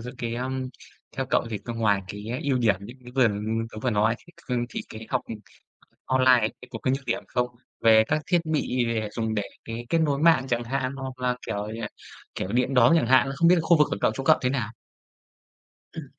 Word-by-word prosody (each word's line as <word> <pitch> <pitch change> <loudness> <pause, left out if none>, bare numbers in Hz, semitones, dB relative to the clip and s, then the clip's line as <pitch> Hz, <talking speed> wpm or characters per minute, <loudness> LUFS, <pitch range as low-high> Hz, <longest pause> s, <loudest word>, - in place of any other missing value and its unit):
giữa 120 +2 -6
cái 115 -1 -3
à 125 +2 -3 0.7
theo 135 - -1
cậu - - +2
thì 105 - -3
c 100 - -27
ngoài 105 -4 +2
cái 105 +2 -7 0.2
ưu 140 -4 +1
điểm 110 -5 +3
như 110 +5 -9
như 125 -1 -12
vừa, 135 - +4
ừm, 110 +1 -1
tớ 110 - -7
vừa 125 - +1
nói 110 +1 +2
thì 175 - -19 0.3
c - - -23
thì - - -5
cái 110 0 -9
học, - - +1
ừm, 110 - -5
c 105 - -23 0.5
online 130 -1 +5
ấy 110 - +1
cái 125 - -12
có 115 - -6
cái 130 - 0
nhược 135 - -12
điểm 120 - -1
không? 125 0 0 0.3
Về 110 -1 +6
các 155 - +1
thiết 175 -2 +3
bị 145 -6 0 0.3
dùng 110 -1 -1
để, 105 - 0 0.2
cái, 115 +1 -6
kết 165 - +2
nối 145 -3 +1
mạng 150 -4 +4
chẳng 120 -1 0
hạn, 130 +1 -2
hoặc 130 -1 -6
là 125 -1 0
kiểu 105 -1 -3
như 115 +1 -6 0.5
kiểu, 95 - -4
điện 125 +2 +1
đóm 125 +5 +6
chẳng - - +2
hạn. 130 +1 +5
À, - - -3
không 170 +3 +4
biết 180 - +7
là 175 - +2
khu 165 +1 +4
vực 150 - +5
của - - -1
cậu, - - +3
chỗ 135 - -5
cậu 155 - +5
thế 125 - +1
nào? 120 -6 -2 1.2
Ừm. - - -7
125 Hz, 250 wpm, -26 LUFS, 110-135 Hz, 1.2 s, biết